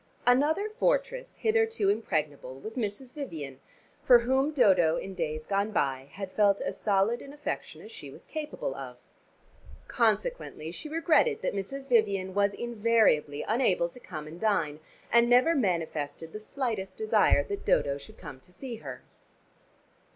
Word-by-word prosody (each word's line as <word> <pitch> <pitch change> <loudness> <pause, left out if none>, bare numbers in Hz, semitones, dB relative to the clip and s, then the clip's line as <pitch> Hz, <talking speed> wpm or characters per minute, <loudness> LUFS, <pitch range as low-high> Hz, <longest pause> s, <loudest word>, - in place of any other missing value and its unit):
Another 295 +11 +3
fortress - - -1
hitherto 450 -2 +1
impregnable 145 - -2
was 220 +9 -8
Mrs. 245 +2 -4
Vivian, 155 - -6 0.4
for 250 -4 +8
whom 265 +5 +1
Dodo 185 - +4
in 195 - -5
days 155 -3 -3
gone 200 +3 0
by 135 -6 -1
had 195 -1 -6
felt 200 -1 +3
as - - -4
solid 205 +3 +1
an 280 - -10
affection 295 0 -5
as 440 - -11
she 455 - -9
was - - -14
capable 300 - -4
of. 130 -2 -8 0.9
Consequently - - -1
she 300 - -7
regretted 340 +8 +2
that - - 0
Mrs. 270 +8 -5
Vivian 200 -6 +2
was 200 0 +2
invariably 220 -11 +2
unable 210 -7 +2
to 250 - -13
come 155 -9 -7
and 160 +3 -10
dine, 165 -9 0 0.3
and 235 +1 +5
never 250 +7 +5
manifested 165 - -2
the 215 - -5
slightest 215 -4 -3
desire 435 0 +3
that 405 -1 -5
Dodo 140 0 +2
should 140 - -13
come 130 - -10
to 180 - -21
see 240 +4 -7
her. 135 -9 -9
215 Hz, 150 wpm, -29 LUFS, -, 0.9 s, for